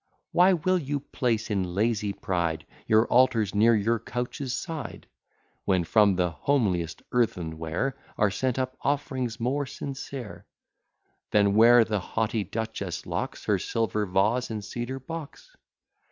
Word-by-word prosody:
Why 185 +2 +5
will 185 +2 +1
you 145 -2 -2
place 115 -5 -1
in 95 -3 -1
lazy 105 -1 +1
pride 85 -5 -2 0.2
Your 110 +1 +5
altars 115 -5 +3
near 110 +3 +5
your 110 +2 +1
couches' 125 +4 -4
side: 165 -5 -6 0.6
When 95 -3 +2
from 100 +2 +4
the 90 -1 +1
homeliest 90 - 0
earthen 90 -10 0
ware 85 +12 -2 0.2
Are 105 -2 +3
sent 130 +4 -1
up 130 0 -2
offerings 130 -4 -1
more 135 +4 -1
sincere, 135 -3 -7 0.8
Than 100 -1 +3
where 115 +2 +7
the 105 -2 -1
haughty 110 +3 -1
duchess 100 -3 -4
locks - - -4
Her - - +2
silver 110 -2 -1
vase 105 +7 +1
in 110 -2 -4
cedar 120 +6 -5
box? 165 - -9
115 Hz, 140 wpm, -27 LUFS, 100-130 Hz, 0.8 s, where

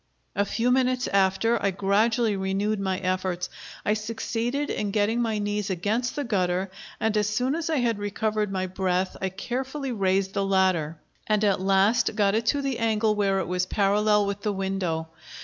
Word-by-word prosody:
A 200 - +2
few 230 +5 0
minutes 255 -1 +2
after, 195 +4 +2
I 200 - +2
gradually 210 +4 +2
renewed 195 +2 -1
my 190 -1 -1
efforts. 185 -1 -2 0.3
I 210 - +3
succeeded 230 +5 -2
in 210 - -2
getting 215 +3 +1
my 225 -2 0
knees 205 -1 -2
against 210 +7 -1
the 290 - -1
gutter, 185 -4 0 0.3
and 220 -1 0
as 210 0 +2
soon 250 +5 0
as 330 0 -2
I 320 - +1
had 235 -4 +1
recovered 210 0 -1
my 185 -1 -1
breath 185 0 -1
I 190 - 0
carefully 260 +8 -4
raised 195 -3 +1
the 200 - 0
ladder, 185 -5 +1 0.3
and 215 -1 +2
at 200 -3 +2
last 195 +4 +3
got 200 -2 +3
it 225 +1 0
to 285 +2 +2
the 270 -3 -2
angle 220 -1 +2
where 200 -2 +1
it - - -4
was 180 +1 -1
parallel 210 +1 +2
with 200 0 -3
the 210 0 -1
window. 190 -4 -2
205 Hz, 185 wpm, -26 LUFS, 190-225 Hz, 0.3 s, I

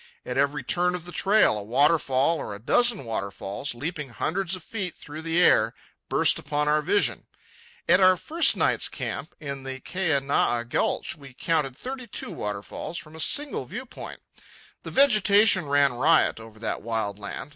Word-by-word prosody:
At 125 - -4
every 140 0 0
turn 180 +6 0
of 175 -1 -6
the 180 - -8
trail 195 - +3
a - - -7
waterfall 140 +5 +2
or 105 - -6
a - - -10
dozen 230 - +3
waterfalls, 100 +3 -4
leaping 150 +2 -5
hundreds 180 +9 -2
of 185 - -11
feet 190 -4 -4
through 150 +2 -9
the 165 +1 0
air, 115 -10 +4 0.3
burst - - +3
upon 150 +1 -2
our 150 +1 +3
vision. 200 +6 0 0.6
At - - +5
our 185 0 +6
first 330 - +2
night's - - +2
camp, - - -5
in 140 -3 -6
the 130 0 -6
Keanae 140 -8 0
Gulch, - - -1
we 135 -4 -14
counted 150 -5 -1
thirty 255 - -7
two - - -6
waterfalls 105 +10 -5
from 155 0 -10
a - - -10
single 285 - 0
viewpoint. 245 - -9 0.6
The - - -7
vegetation 210 - +4
ran 140 -2 +3
riot 150 +1 +3
over 110 -1 -13
that 110 - -3
wild 110 -3 -3
land. 100 +6 -7
150 Hz, 165 wpm, -25 LUFS, 125-185 Hz, 0.6 s, our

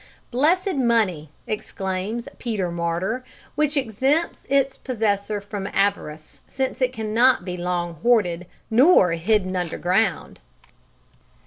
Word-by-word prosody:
"Blessed 330 +7 +2
money," 215 - +1 0.2
exclaims 200 +2 -4
Peter 205 -7 -2
Martyr, 170 +8 -2 0.3
"which 300 0 0
exempts 270 +6 0
its 275 -1 +2
possessor 210 -4 -1
from 200 -1 -6
avarice, 180 -7 -2
since 265 0 -3
it 255 -1 +2
cannot 225 -1 +2
be 180 -1 -4
long 175 -1 -2
hoarded, 180 -7 +2 0.2
nor 240 - +6
hidden 185 +2 +1
underground!" 180 +4 -1
210 Hz, 105 wpm, -23 LUFS, 180-255 Hz, 0.3 s, nor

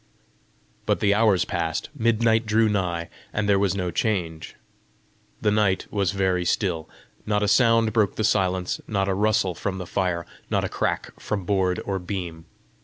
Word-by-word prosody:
But - - +2
the 100 -1 +3
hours 105 -3 +3
passed, 80 -3 -2
midnight 115 -2 +2
drew 110 +1 +3
nigh, 90 -5 -1 0.2
and 105 -1 -1
there 100 -1 +4
was 100 -1 +1
no 90 -2 -2
change. 85 -4 -2 0.9
The 105 - +2
night 105 -3 +2
was 100 -4 +1
very 95 -2 +1
still. 85 -3 -1 0.4
Not 105 -1 +1
a - - +2
sound 115 +1 +4
broke 110 -4 +2
the 110 - -1
silence, 95 -3 +1
not 100 -2 0
a 95 - +1
rustle 105 -1 +1
from 95 +3 -3
the 90 - -5
fire, 90 -2 -1 0.2
not - - +1
a - - -2
crack - - -2
from 100 -4 -3
board 95 -2 +1
or 95 -1 -2
beam. 90 -3 -5
100 Hz, 170 wpm, -24 LUFS, 90-105 Hz, 0.9 s, there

